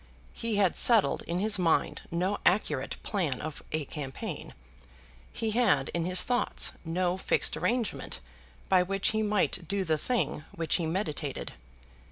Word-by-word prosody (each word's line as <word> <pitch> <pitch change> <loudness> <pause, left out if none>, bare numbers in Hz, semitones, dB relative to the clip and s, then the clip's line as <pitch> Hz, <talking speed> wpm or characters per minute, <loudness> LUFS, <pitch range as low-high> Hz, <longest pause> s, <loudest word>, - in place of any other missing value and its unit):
He 230 -2 -2
had 195 -3 +3
settled 230 -4 +5
in 170 - -1
his 205 +1 +3
mind 165 -3 +1
no 185 +4 -1
accurate 155 -8 +1
plan 165 - -1
of 155 -1 -6
a 155 -1 -1
campaign; 135 -2 -6 0.8
he 225 -1 -2
had 235 -1 +2
in 170 -1 -2
his 180 0 +5
thoughts 245 0 +1
no 175 +2 0
fixed - - +1
arrangement 240 -2 -1 0.5
by 185 -1 +5
which 195 +2 +1
he 220 0 0
might 205 -5 +1
do 200 0 0
the 160 -3 0
thing 235 - -1
which 165 -3 0
he 170 -3 -1
meditated. 160 -5 -3
185 Hz, 150 wpm, -29 LUFS, 165-210 Hz, 0.8 s, settled